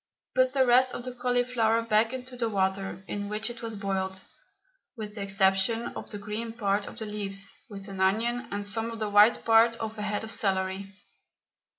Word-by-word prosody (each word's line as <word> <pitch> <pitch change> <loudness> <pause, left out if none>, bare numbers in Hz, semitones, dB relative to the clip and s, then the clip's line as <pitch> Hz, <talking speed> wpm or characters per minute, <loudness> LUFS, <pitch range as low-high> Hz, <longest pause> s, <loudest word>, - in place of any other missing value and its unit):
Put 255 0 +3
the 265 -2 +4
rest 250 +1 +4
of - - -5
the 255 0 -5
cauliflower 245 -2 +1
back 225 0 +3
into 255 0 -6
the 235 -2 -1
water 195 -1 -1
in 205 0 -4
which 215 +2 -2
it 235 - -10
was 225 -1 -5
boiled, 190 -2 -2 0.8
with 210 -2 -6
the 210 - -6
exception 195 +4 +2
of - - -8
the 205 - -6
green 210 +3 -4
part 200 -3 0
of - - -9
the 220 - -5
leaves, 200 -2 -4 0.2
with 200 -1 -9
an 195 -1 -7
onion 230 +6 +1
and 205 0 -3
some 225 +3 -2
of 230 - -6
the 215 -2 -2
white 210 +3 +6
part 230 +1 +6
of 220 -1 -5
a - - -2
head 210 0 -2
of 220 - -5
celery. 190 -1 -1
215 Hz, 200 wpm, -28 LUFS, 200-230 Hz, 0.8 s, white